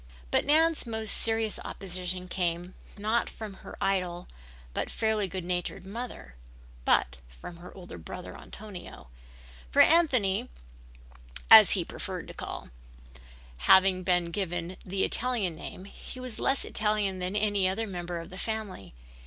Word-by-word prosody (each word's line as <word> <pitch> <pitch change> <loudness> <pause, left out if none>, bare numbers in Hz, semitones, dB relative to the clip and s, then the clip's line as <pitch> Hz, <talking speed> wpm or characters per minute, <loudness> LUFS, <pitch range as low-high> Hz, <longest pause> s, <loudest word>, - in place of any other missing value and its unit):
But - - +2
Nan's 315 -1 +3
most 220 -2 -1
serious 225 -1 +1
opposition 185 -1 -4
came 175 0 -2 0.2
not 215 +3 +1
from 215 -3 -7
her - - -10
idle 180 -2 -1 0.5
but - - -2
fairly 220 -2 0
good 185 -1 -5
natured 180 +1 -3
mother 215 - -7 0.5
but 65 +1 +3
from - - -10
her 175 +1 -11
older 175 - -9
brother 80 - -8
Antonio, 195 - -10 0.7
or - - +8
Anthony 255 - +3 1.0
as - - +11
he - - +1
preferred - - -5
to - - -8
be - - -22
called. - - -6 0.9
Having 190 - +5
been 175 -2 +1
given 175 -1 -3
the 190 +1 -1
Italian 230 -8 +2
name 185 +3 -8
he 230 +5 -10
was 255 -3 -5
less 270 - +1
Italian 210 -3 0
than 180 +2 -2
any 205 -3 +2
other 220 +4 -1
member 175 -3 -5
of 165 - -9
the 185 - -8
family. 215 - -4
190 Hz, 145 wpm, -29 LUFS, 180-220 Hz, 1.0 s, as